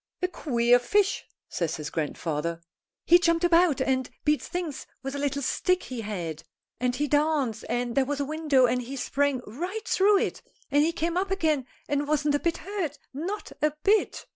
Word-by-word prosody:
"A - - +4
queer 245 -8 +3
fish," 400 +11 +1 0.2
says 170 -2 -2
his 150 -2 -6
grandfather. 160 +1 -2 0.5
"He 350 - +7
jumped 335 0 +2
about 340 -4 +4
and 260 -1 0 0.2
beat 300 0 +3
things 345 -6 -5 0.2
with 270 0 -4
a 285 - -3
little 280 0 -1
stick 365 +7 +1
he 250 -3 -5
had. 175 -7 -5 0.4
And 250 0 0
he 295 +3 0
danced, 290 -6 +1
and 240 0 -1
there 270 +1 +3
was 290 +1 -2
a 285 - 0
window 300 -3 +3
and 250 +1 +1
he 255 +3 -6
sprang 275 0 0
right 360 - -5
through 400 +2 +4
it, - - -1 0.3
and 290 +1 +4
he 320 +3 +3
came 335 +1 -1
up 380 +1 0
again 315 -9 +1 0.2
and 285 0 0
wasn't 300 -1 +1
a 290 - +2
bit 340 +1 0
hurt, 370 -7 -4 0.2
not 355 +10 -4
a 300 -1 +2
bit. 420 +1 +2
290 Hz, 190 wpm, -27 LUFS, 250-335 Hz, 0.5 s, He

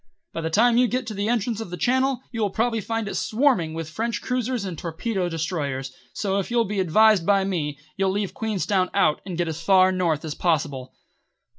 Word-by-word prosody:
"By 165 - -3
the 160 - -2
time 230 +7 +4
you 250 0 +5
get 255 +2 -2
to 220 - -5
the 205 +2 -2
entrance 230 -1 0
of 225 - -6
the 180 - -6
Channel 260 +2 +1
you 230 -2 -3
will 205 - +2
probably 225 +2 0
find 225 +1 -3
it - - -4
swarming 215 - +1
with 165 -1 -4
French 225 +8 -2
cruisers 250 -3 -2
and 185 -3 -4
torpedo 180 +4 -3
destroyers, 145 -5 -3 0.2
so 195 -1 -1
if 195 - -3
you'll 235 -1 +2
be 205 0 -3
advised 205 +2 +4
by 195 +2 +3
me, 160 -7 -2 0.2
you'll 195 -1 +2
leave 200 0 -2
Queenstown 200 -4 0
out 175 -6 +3
and 180 -3 -4
get 175 -1 0
as 160 0 -4
far 185 +1 +5
north 170 -5 0
as 155 - -3
possible." 145 -7 -1
195 Hz, 210 wpm, -24 LUFS, 165-225 Hz, 0.2 s, you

